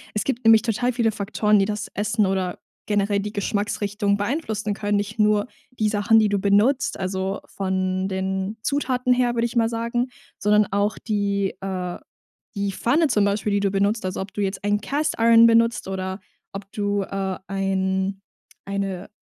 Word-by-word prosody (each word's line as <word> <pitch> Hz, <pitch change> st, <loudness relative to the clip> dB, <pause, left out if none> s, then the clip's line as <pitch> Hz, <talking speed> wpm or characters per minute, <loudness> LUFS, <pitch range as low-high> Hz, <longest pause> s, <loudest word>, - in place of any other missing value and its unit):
Es 210 Hz, -, 0 dB
gibt 250 Hz, -2 st, -2 dB
nämlich 225 Hz, 0 st, +6 dB
total 240 Hz, +2 st, 0 dB
viele 235 Hz, -2 st, +1 dB
Faktoren, 210 Hz, +1 st, +1 dB
die 195 Hz, -, +3 dB
das 210 Hz, +1 st, -3 dB
Essen 210 Hz, +1 st, +1 dB
oder 190 Hz, -2 st, -1 dB, 0.3 s
generell 205 Hz, -1 st, +1 dB
die 210 Hz, +1 st, -5 dB
Geschmacksrichtung 205 Hz, 0 st, -1 dB
beeinflussen 215 Hz, -2 st, -2 dB
können. 205 Hz, 0 st, -1 dB
Nicht 205 Hz, +1 st, -3 dB
nur 210 Hz, -1 st, +3 dB, 0.3 s
die 215 Hz, -, +2 dB
Sachen, 210 Hz, +1 st, +3 dB
die 215 Hz, -1 st, +3 dB
du 200 Hz, 0 st, +1 dB
benutzt, 205 Hz, +7 st, +2 dB
also 190 Hz, +1 st, -2 dB
von 185 Hz, -1 st, -2 dB
den 190 Hz, +2 st, -2 dB
Zutaten 255 Hz, -3 st, +1 dB
her, 245 Hz, -1 st, +1 dB
würde 230 Hz, 0 st, +1 dB
ich 235 Hz, -, -4 dB
mal 225 Hz, -1 st, +3 dB
sagen, 235 Hz, +2 st, -1 dB, 0.3 s
sondern 210 Hz, 0 st, +4 dB
auch 205 Hz, +1 st, +1 dB
die, 200 Hz, -3 st, -1 dB
äh, 185 Hz, -2 st, -4 dB, 0.6 s
die 200 Hz, 0 st, -1 dB
Pfanne 300 Hz, -, +2 dB
zum 215 Hz, -6 st, +2 dB
Beispiel, 205 Hz, +1 st, 0 dB
die 205 Hz, -, +2 dB
du 200 Hz, -, +2 dB
benutzt. 200 Hz, +2 st, +1 dB
Also 185 Hz, 0 st, -3 dB
ob 190 Hz, 0 st, -6 dB
du 205 Hz, -, -3 dB
jetzt 195 Hz, -1 st, -2 dB
einen 205 Hz, 0 st, +1 dB
Cast-Iron 230 Hz, -6 st, +4 dB
benutzt 230 Hz, -1 st, +3 dB
oder 190 Hz, 0 st, -4 dB, 0.3 s
ob 195 Hz, 0 st, -8 dB
du, 205 Hz, -1 st, 0 dB
äh, 195 Hz, -1 st, -3 dB
ein 195 Hz, 0 st, -1 dB, 0.5 s
eine, 195 Hz, -2 st, -3 dB
205 Hz, 170 wpm, -23 LUFS, 195-225 Hz, 0.6 s, nämlich